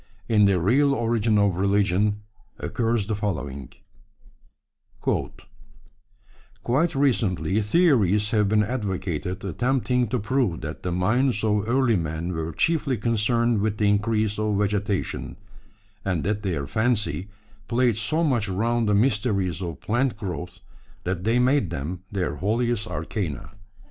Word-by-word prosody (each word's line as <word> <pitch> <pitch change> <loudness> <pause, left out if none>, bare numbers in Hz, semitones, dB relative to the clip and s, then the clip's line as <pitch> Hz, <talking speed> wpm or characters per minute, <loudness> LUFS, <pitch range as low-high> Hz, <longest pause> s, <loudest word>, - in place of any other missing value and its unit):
In 105 -3 +4
The 95 -2 +3
Real 135 - +3
Origin 115 -2 +1
of 100 -3 +2
Religion 100 +1 +1 0.4
occurs 115 -3 -1
the 110 - -2
following: 75 - -4 1.3
Quite 105 - -5
recently 110 - +1
theories 105 - +3
have 105 -3 +2
been 105 0 +3
advocated 95 - -3
attempting 125 +4 0
to 125 - -1
prove 115 -5 0
that 80 0 -6
the 90 - -3
minds 110 +7 +1
of 105 0 +1
early 125 -3 +3
men 80 +1 -3
were 80 0 -3
chiefly 140 - 0
concerned 115 0 +1
with 105 0 -1
the 105 -1 +2
increase 105 0 +1
of 105 -1 0
vegetation, 105 -1 -2 0.7
and 90 -6 -1
that 105 +2 -1
their 85 -9 -2
fancy 105 - 0 0.4
played 120 -1 +2
so 155 +10 0
much 120 -9 +1
round 115 +3 0
the 105 - +3
mysteries 100 - +1
of 85 -4 -5
plant 120 +1 0
growth 90 -8 -6 0.4
that 90 0 -3
they 115 +2 +3
made 125 - +2
them 85 +4 -4
their 90 -7 -2
holiest 110 +3 0
arcana. 80 - -4
105 Hz, 130 wpm, -24 LUFS, 95-120 Hz, 1.3 s, In